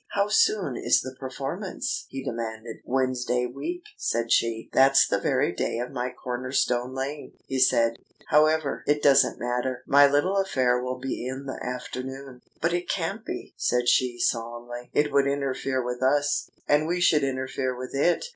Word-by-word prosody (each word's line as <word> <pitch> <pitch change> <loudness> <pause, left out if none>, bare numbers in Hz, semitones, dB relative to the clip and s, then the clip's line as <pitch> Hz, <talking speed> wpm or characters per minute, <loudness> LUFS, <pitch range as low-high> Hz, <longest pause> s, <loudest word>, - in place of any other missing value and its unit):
"How 200 0 +2
soon 195 - +2
is 120 - +3
the 130 0 -7
performance?" 185 - -4
he 135 - -6
demanded. 115 -2 -5
"Wednesday 125 -1 0
week," 335 - -5
said 115 0 -1
she. 115 -1 +1
"That's 135 +1 +6
the - - 0
very 85 - +1
day 90 - -2
of 125 +1 -4
my 125 +1 -2
corner 125 0 -5
stone 125 -1 0
laying," 140 +3 -5
he 135 - -2
said. 115 -3 +3 0.3
"However, 155 -1 +3
it 145 0 +2
doesn't 140 -2 +5
matter. 125 +1 -2
My 145 0 +6
little 165 +8 +2
affair 130 -10 +1
will 125 0 -3
be 130 -1 -4
in 135 +2 -5
the 135 - -6
afternoon." 130 +1 -6 0.2
"But 170 +1 0
it 175 0 -2
can't 195 +5 -2
be," - - -6
said 125 0 +1
she 125 0 +3
solemnly. 120 +1 -3
"It 150 0 +1
would 140 0 +3
interfere 135 -2 -1
with 125 0 -4
us, 145 +2 +1 0.2
and 150 +1 +3
we 175 +2 0
should 155 -4 +4
interfere 130 -1 -2
with 130 0 -7
it. 160 - +2
130 Hz, 170 wpm, -26 LUFS, 125-145 Hz, 0.3 s, That's